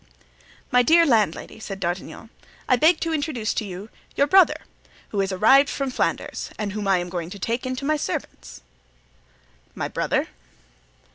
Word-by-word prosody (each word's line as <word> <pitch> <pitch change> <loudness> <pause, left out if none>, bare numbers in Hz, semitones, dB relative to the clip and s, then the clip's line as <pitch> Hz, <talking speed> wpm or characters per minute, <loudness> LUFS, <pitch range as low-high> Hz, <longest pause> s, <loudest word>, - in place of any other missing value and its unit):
"My 250 -1 +5
dear 330 +7 +5
landlady," 220 - 0
said 195 -3 -7
D'Artagnan, 180 +5 -5 0.4
"I 255 - +5
beg 315 +7 +4
to 330 -1 -1
introduce 285 -8 -2
to - - -2
you 195 +2 -8 0.3
your 280 - +3
brother, 375 +4 +4 0.5
who 200 - -1
is 195 0 -1
arrived 265 +9 +5
from 275 -2 -3
Flanders - - -2
and 210 -2 -3
whom 205 0 -4
I 195 -1 +4
am 175 0 -3
going 175 -2 -4
to 200 - -8
take 230 +6 -2
into 255 +2 -4
my 305 +1 +1
service." 65 - -6 1.1
"My - - -3
brother?" - - -1
225 Hz, 160 wpm, -23 LUFS, 195-280 Hz, 1.1 s, My